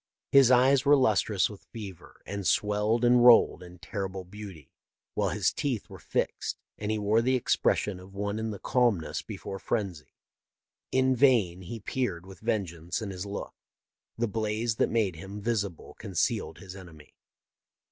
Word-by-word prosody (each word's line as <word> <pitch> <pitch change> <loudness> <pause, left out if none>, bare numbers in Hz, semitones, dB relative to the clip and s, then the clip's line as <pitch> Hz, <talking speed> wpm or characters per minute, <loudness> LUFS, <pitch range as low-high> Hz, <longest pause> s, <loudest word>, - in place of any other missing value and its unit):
His 135 -3 +7
eyes 130 +1 +5
were 145 0 +6
lustrous 110 -5 +2
with 105 -2 -12
fever, 100 -7 -10
and 100 -2 -4
swelled 105 +3 +2
and 120 0 +5
rolled 120 -1 +6
in 90 0 -12
terrible 95 0 -5
beauty, 95 -4 -10 0.4
while - - 0
his - - +1
teeth 130 -7 -3
were - - -10
fixed, - - -2 0.2
and 105 - -3
he 110 - 0
wore 105 +2 +2
the 130 +2 +2
expression 105 -5 +1
of 95 +2 -14
one 100 +1 -2
in 110 0 -2
the 105 - -5
calmness 115 -9 +1
before 95 - -7
frenzy. 95 -10 -3 0.8
In 130 0 +3
vain 115 -9 +3
he 110 +6 -7
peered, 100 -6 -3
with 95 -1 -12
vengeance 90 -7 -2
in 105 -3 -5
his 95 +1 -6
look; 100 - -6 0.6
the 120 +1 0
blaze 110 +1 -1
that - - +2
made 105 -7 0
him 95 +5 -8
visible 100 -5 -3
concealed - - -1
his 95 0 -10
enemy. 85 -6 -13
105 Hz, 160 wpm, -28 LUFS, 95-120 Hz, 0.8 s, His